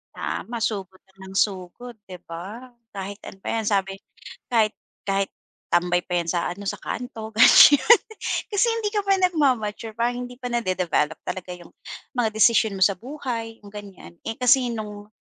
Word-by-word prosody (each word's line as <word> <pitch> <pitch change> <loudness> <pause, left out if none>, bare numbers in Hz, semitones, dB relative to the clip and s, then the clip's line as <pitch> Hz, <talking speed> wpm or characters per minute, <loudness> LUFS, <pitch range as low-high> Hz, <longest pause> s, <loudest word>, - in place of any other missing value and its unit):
Tama, 235 0 -4
sugod 195 -4 -3
lang 190 0 -13
ng - - -11
sugod, 205 +5 -2
'di 185 -2 -10
ba, 195 +10 -8 0.2
kahit 200 0 -6
ano - - -10
pa - - -11
'yan 225 -1 -1
sabi 195 -2 +1 0.6
kahit 220 -2 +2 0.3
kahit 195 0 0 0.4
tambay 175 0 +2
pa 180 -1 -1
'yan 170 - -4
sa 175 0 -1
ano, 200 +2 -7
sa - - -1
kanto 225 -3 -5
ganyan, 280 - +8 0.5
kasi 410 +3 +3
hindi 455 -2 -1
ka 410 -2 -2
pa 390 - +5
nagma-mature, 255 - 0
parang 245 +1 -1
hindi 245 - -12
pa 245 -1 -6
nade-develop 185 -8 0
talaga 180 -1 -5
'yung 175 -1 -15 0.4
mga 245 -4 +1
desisyon 220 -1 +3
mo 190 - +3
sa 190 -2 +2
buhay, 240 -5 -5
'yung 200 - -13
ganyan. 195 - -11
Eh, 225 - -3
kasi 250 0 +4
no'ng 210 -3 -6
215 Hz, 170 wpm, -24 LUFS, 190-245 Hz, 0.6 s, ganyan